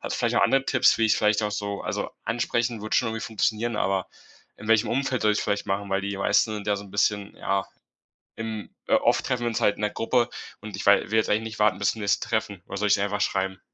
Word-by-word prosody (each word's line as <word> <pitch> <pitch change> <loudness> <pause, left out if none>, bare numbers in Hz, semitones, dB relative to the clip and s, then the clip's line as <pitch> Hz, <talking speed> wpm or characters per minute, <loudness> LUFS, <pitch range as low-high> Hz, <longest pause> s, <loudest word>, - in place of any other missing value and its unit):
Hast - - -4
du - - -6
vielleicht - - 0
noch - - +4
andere 135 0 +3
Tipps, 130 -3 +3
wie 115 - +3
ich 110 - +3
vielleicht 105 0 +2
auch 105 - 0
so 100 -1 -3
also, - - -3
ansprechen 120 0 -1
würde 110 - -3
schon 115 - +2
irgendwie 110 0 -4
funktionieren, 110 +1 -1
aber 95 -2 0 0.5
in 105 +1 -10
welchem 115 -1 +4
Umfeld 130 0 0
soll 105 - +4
ich's 105 - 0
vielleicht 100 - -1
machen? 100 +1 -2
Weil 95 - +1
die 100 0 -3
meisten 100 +2 +2
sind 105 -1 -6
ja 105 - +1
so 100 - -7
'n 95 - -14
bisschen, 100 0 0
ja, 95 0 -1 0.7
im 110 -2 -6
äh, - - +1
oft - - +2
treffen 125 -1 -1
wir - - 0
uns 115 - -2
halt 105 - +3
in - - -9
'ner 105 - +1
Gruppe 120 +1 +1 0.3
und 105 -2 -7
ich 100 - -6
wei 100 0 +4
will 110 - +3
jetzt 110 - +2
eigentlich 110 +2 +2
nicht 110 -1 -7
warten 105 -3 +3
bis 100 - +2
zum 110 - -8
nächsten 100 0 0
Treffen. 100 -4 -2
Oder - - -6
soll 105 - 0
ich's 105 - +4
ihr 100 - 0
einfach 105 0 -2
schreiben? 95 0 -1
105 Hz, 270 wpm, -25 LUFS, 100-110 Hz, 0.7 s, noch